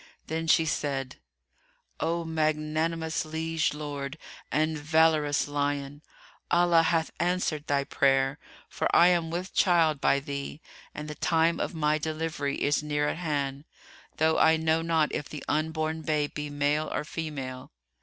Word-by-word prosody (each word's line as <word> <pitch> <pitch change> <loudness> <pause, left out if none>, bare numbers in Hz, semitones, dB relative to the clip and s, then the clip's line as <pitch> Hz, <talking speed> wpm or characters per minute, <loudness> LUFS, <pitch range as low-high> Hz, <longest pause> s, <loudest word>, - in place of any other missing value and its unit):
Then 165 +1 -3
she 160 0 +4
said, 135 -4 -2 0.8
"O 170 0 -1
magnanimous 160 +1 -1
liege 160 0 -1
lord, 145 -1 -5 0.3
and 155 +1 +1
valorous 155 -1 +2
lion, 145 0 -2 0.5
Allah 175 -1 +5
hath 165 0 +1
answered 175 -4 0
thy 140 -1 +1
prayer, 135 0 +2 0.3
for - - -1
I 175 - +7
am 170 -2 +1
with 180 +3 -4
child 165 -6 +3
by 140 - +3
thee 140 +1 -6 0.4
and 150 - -6
the 150 - -5
time 165 +1 +1
of - - -3
my 155 -1 +1
delivery 155 -2 -2
is 145 +1 +2
near 150 0 0
at - - -3
hand, 145 -4 -2 0.5
though 160 +1 +3
I 160 0 +5
know 160 0 +1
not 165 -2 +1
if 145 - -3
the 150 - -7
unborn 155 +1 -1
babe 150 -1 -1
be 150 0 -4
male 145 +2 0
or - - -2
female. 135 -5 -6
155 Hz, 145 wpm, -28 LUFS, 145-160 Hz, 0.8 s, I